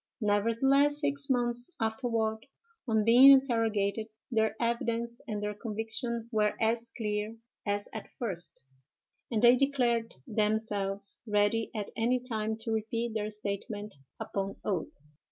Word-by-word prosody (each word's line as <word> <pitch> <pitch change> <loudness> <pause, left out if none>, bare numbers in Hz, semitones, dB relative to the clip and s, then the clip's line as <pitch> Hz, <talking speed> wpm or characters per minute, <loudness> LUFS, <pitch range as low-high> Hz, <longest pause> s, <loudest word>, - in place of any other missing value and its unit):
Nevertheless, 240 +7 +3
six 280 -1 -1
months 240 -1 +1
afterward, 225 -1 -1 0.4
on 220 -2 +2
being 245 +4 +9
interrogated, 225 -6 +3 0.2
their 220 -2 +2
evidence 235 0 -1
and 210 -1 -3
their 210 0 -2
conviction 225 +2 -3
were 210 -2 +2
as 230 +1 +1
clear 210 0 -2 0.3
as 205 0 0
at 220 - -7
first, 185 - -4 0.7
and 225 -2 -1
they 240 +1 +8
declared 245 -4 +1
themselves 210 -2 -1
ready 210 +2 +2
at 210 -2 -4
any 240 +3 +2
time 220 -3 -2
to 225 - -3
repeat 225 +1 -2
their 215 -1 -2
statement 205 0 -3 0.3
upon 195 0 -3
oath." 185 -6 -2
225 Hz, 125 wpm, -30 LUFS, 210-235 Hz, 0.7 s, being